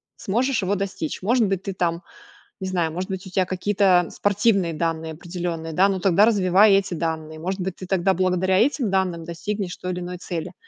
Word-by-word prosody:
сможешь 240 +4 0
его 190 +2 0
достичь. 190 -5 -4
Может 230 +2 +2
быть, 195 -1 -2
ты 195 - -4
там, 170 -2 -1 0.6
не 190 - -3
знаю, 170 -4 -1
может 185 +3 -4
быть, 190 0 -5
у - - -8
тебя 185 0 +1
какие-то 185 -1 +2
спортивные 200 -4 +1
данные 160 0 -2
определенные, 170 -1 -5
да, 190 +4 +4
но 190 -1 -1
тогда 195 +2 +4
развивай 200 -1 +4
эти 195 -2 +2
данные. 160 -1 -3
Может 185 +4 -3
быть, 185 0 -3
ты 185 - -9
тогда 190 0 +2
благодаря 185 +1 +1
этим 250 0 +2
данным 185 -3 0
достигнешь 180 +3 -4
той 180 - -5
или 180 - -4
иной 180 0 -6
цели. 175 -1 -5
185 Hz, 195 wpm, -23 LUFS, 170-195 Hz, 0.6 s, да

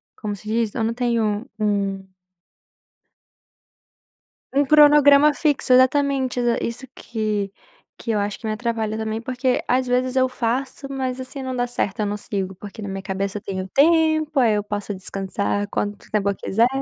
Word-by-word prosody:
como 210 -2 -4
se 210 - -14
diz? 225 -1 0
Eu 230 - -1
não 225 +1 0
tenho 230 -2 0
um 200 -2 0 2.5
um 285 +1 +4
cronograma 295 0 +6
fixo, 285 -5 +2
exatamente, 260 -1 +3
exa 240 -1 +2
isso 240 +3 -5
que 210 -3 -3 0.5
que 230 - -2
eu 210 - +1
acho 205 0 -3
que 225 - -8
me 215 - -1
atrapalha 220 -1 -2
também, 220 0 -3
porque 255 +1 0
às 255 0 +1
vezes 250 +1 +1
eu 260 -1 +3
faço, 255 +3 -2
mas 260 -2 -3
assim, 265 +1 -7
não 260 -1 -4
dá 245 0 0
certo, 215 -5 -2
eu 210 - 0
não 205 +1 -2
sigo, 195 -2 -4
porque 205 +3 -10
na 205 - -5
minha 195 0 -5
cabeça 195 +1 -3
eu - - -15
tenho 190 -1 -4
tempo, 315 0 +3
aí 230 -4 +4
eu 205 - 0
posso 205 0 -4
descansar 195 +1 -2
quanto 205 0 -4
tempo 205 -2 +1
eu 195 - -4
quiser. 230 +5 +2
230 Hz, 175 wpm, -22 LUFS, 205-260 Hz, 2.5 s, cronograma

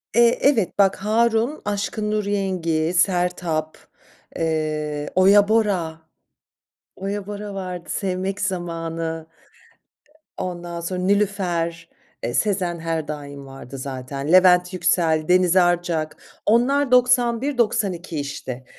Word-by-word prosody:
Eee, 235 0 +5
evet, 230 -10 +2
bak, 195 -1 +4
Harun, 225 +6 +1
Aşkın 210 +1 -2
Nur 215 -1 0
Yengi, 180 -5 -1
Sertab, 175 -3 0 0.6
eee, 155 -2 -2
Oya 200 +2 +6
Bora, 190 -8 0 1.0
Oya 195 +1 -4
Bora 205 0 -6
vardı, 180 -3 -6
Sevmek 190 +1 -2
Zamanı, 165 -3 -3 0.9
e 310 - -12
ondan 175 -1 -5
sonra 180 +2 -3
Nilüfer, 180 -4 0 0.3
eee, 120 - -2
Sezen 185 - 0
her 165 -2 -3
daim 145 -2 -7
vardı 135 0 -10
zaten. 135 +2 -5
Levent 180 0 +5
Yüksel, 165 -3 +1
Deniz 180 0 +4
Arcak, 175 -4 +1 0.3
onlar 255 +5 +2
91-92, 235 - +2
işte. 130 -3 -6
180 Hz, 105 wpm, -22 LUFS, 165-205 Hz, 1.0 s, Oya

